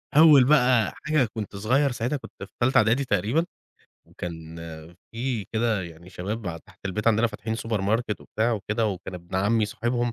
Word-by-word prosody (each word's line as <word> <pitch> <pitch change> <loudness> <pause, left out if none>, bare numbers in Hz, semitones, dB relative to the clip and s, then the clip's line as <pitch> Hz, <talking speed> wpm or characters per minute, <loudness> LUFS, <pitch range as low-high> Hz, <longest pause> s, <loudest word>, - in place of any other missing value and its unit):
أول 150 -4 +8
بقى 125 -5 +4
حاجة 150 -7 +2
كنت 105 -3 -5
صغير 130 +8 +2
ساعتها 120 +4 -1
كنت 130 - -11
في 100 - -11
تالتة 130 +2 +3
إعدادي 120 +5 +3
تقريبًا، 115 - +1 0.6
وكان 80 -2 -7 0.6
في 115 -3 -2
كده 110 -3 +1
يعني 85 +1 -11
شباب 100 +4 -5
ع 85 - -3
تحت - - -21
البيت 105 +3 -3
عندنا 115 +1 +4
فاتحين 110 0 -4
supermarket 110 0 -1
وبتاع 115 +3 -1
وكده، 110 +1 -1
وكان 95 -2 -4
ابن 85 0 -9
عمي 105 +3 +2
صاحبهم 120 +2 -1
110 Hz, 165 wpm, -25 LUFS, 100-120 Hz, 0.6 s, أول